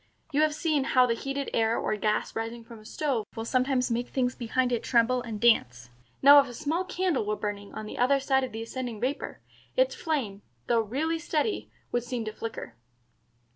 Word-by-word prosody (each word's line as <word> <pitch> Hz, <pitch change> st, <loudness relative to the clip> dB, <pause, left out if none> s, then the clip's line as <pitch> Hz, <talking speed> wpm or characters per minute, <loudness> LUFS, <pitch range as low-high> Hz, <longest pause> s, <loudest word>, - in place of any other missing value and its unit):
You 290 Hz, +1 st, +2 dB
have 310 Hz, -1 st, +2 dB
seen 305 Hz, -4 st, +1 dB
how 255 Hz, -2 st, +5 dB
the 235 Hz, -, +1 dB
heated 275 Hz, +3 st, -4 dB
air 225 Hz, 0 st, +2 dB
or 215 Hz, -, -1 dB
gas 210 Hz, 0 st, -1 dB
rising 230 Hz, +1 st, -4 dB
from 230 Hz, 0 st, -12 dB
a 215 Hz, -, -17 dB
stove 260 Hz, -1 st, -1 dB
will 225 Hz, 0 st, -4 dB
sometimes 255 Hz, 0 st, +1 dB
make 240 Hz, +1 st, -1 dB
things 250 Hz, -2 st, 0 dB
behind 250 Hz, +1 st, 0 dB
it 240 Hz, -, 0 dB
tremble 245 Hz, +1 st, +2 dB
and 225 Hz, -3 st, -6 dB
dance. 125 Hz, -, +2 dB, 0.3 s
Now 285 Hz, +1 st, +10 dB
if 280 Hz, -, +2 dB
a 245 Hz, -, -9 dB
small 310 Hz, +6 st, -1 dB
candle 365 Hz, -7 st, 0 dB
were 210 Hz, 0 st, -1 dB
burning 205 Hz, -1 st, -5 dB
on 215 Hz, -, -5 dB
the -, -, -7 dB
other 270 Hz, +3 st, +4 dB
side 265 Hz, 0 st, +2 dB
of 260 Hz, -, -3 dB
the 225 Hz, +1 st, -5 dB
ascending 240 Hz, -2 st, -5 dB
vapor, 260 Hz, +5 st, -3 dB, 0.4 s
its -, -, +3 dB
flame, 250 Hz, -, -2 dB, 0.2 s
though 230 Hz, -1 st, +3 dB
really 300 Hz, +10 st, -1 dB
steady, 330 Hz, +5 st, -1 dB, 0.2 s
would 240 Hz, -, 0 dB
seem 245 Hz, -2 st, -4 dB
to 215 Hz, -, -4 dB
flicker." 225 Hz, -, -6 dB
245 Hz, 205 wpm, -28 LUFS, 225-280 Hz, 0.4 s, Now